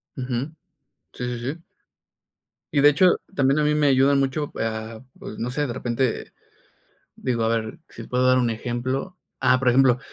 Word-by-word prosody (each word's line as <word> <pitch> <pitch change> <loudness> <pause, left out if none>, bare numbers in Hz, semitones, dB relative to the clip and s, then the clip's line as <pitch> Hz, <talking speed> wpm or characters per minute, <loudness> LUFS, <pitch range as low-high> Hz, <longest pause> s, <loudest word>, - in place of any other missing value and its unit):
Ujú. 130 +4 -4 0.6
Sí, 125 - -6
sí, 125 -1 -3
sí. 145 +7 -5 1.1
Y 140 - +3
de 145 - +8
hecho, 180 +5 +4 0.2
también 140 -2 +2
a - - +2
mí 150 0 +2
me 150 -1 +3
ayudan 135 +1 +4
mucho 140 +2 -1
a, 110 0 -4 0.2
pues, - - -9
no 120 - -2
sé, 145 +3 -1
de 120 - -4
repente, 125 0 -2 0.8
digo, 120 -3 -1
a - - +2
ver, 115 -1 -2
si 115 - -9
puedo 125 +2 0
dar 130 0 +5
un 125 -2 +2
ejemplo. 130 +9 -3 0.2
Ah, 125 - +3
por 125 -1 +1
ejemplo, 125 0 +4
130 Hz, 180 wpm, -23 LUFS, 120-140 Hz, 1.1 s, de